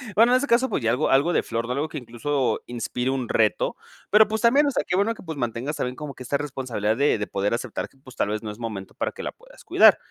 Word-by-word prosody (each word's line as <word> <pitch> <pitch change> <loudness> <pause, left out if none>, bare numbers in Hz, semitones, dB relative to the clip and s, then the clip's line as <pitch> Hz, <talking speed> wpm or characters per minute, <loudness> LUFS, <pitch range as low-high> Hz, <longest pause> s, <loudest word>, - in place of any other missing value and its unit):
Bueno, 230 +3 +6
en - - +7
ese 285 +2 -1
caso, 245 +3 +3
pues 130 - -2
ya 115 - +3
algo 125 +6 +1
algo 145 +6 +3
de - - +2
flor, 115 0 -2
no 125 - -4
algo 145 +3 -2
que 150 - -6
incluso 130 +2 -1
inspire 120 +1 -3
un 130 -2 -1
reto, 110 -2 +1 0.4
pero 215 +1 +7
pues 220 +1 -2
también, 270 +5 +5
o 280 - +1
sea, - - 0
qué 180 - 0
bueno 205 +4 +2
que - - -13
pues 160 -3 -6
mantengas 120 +4 -2
también 125 -2 -3
como 150 -2 -7
que 130 - -10
esta 140 +3 0
responsabilidad 130 -7 -2
de 140 -2 +3
de 105 - -3
poder 100 +2 -1
aceptar 120 0 -3
que 135 - -28
pues 130 -2 -15
tal - - 0
vez 105 +1 -3
no 105 - -4
es 105 - -11
momento 105 -5 -6
para - - -2
que - - -8
la - - -3
puedas - - -18
cuidar. - - +6
135 Hz, 285 wpm, -24 LUFS, 115-170 Hz, 0.4 s, en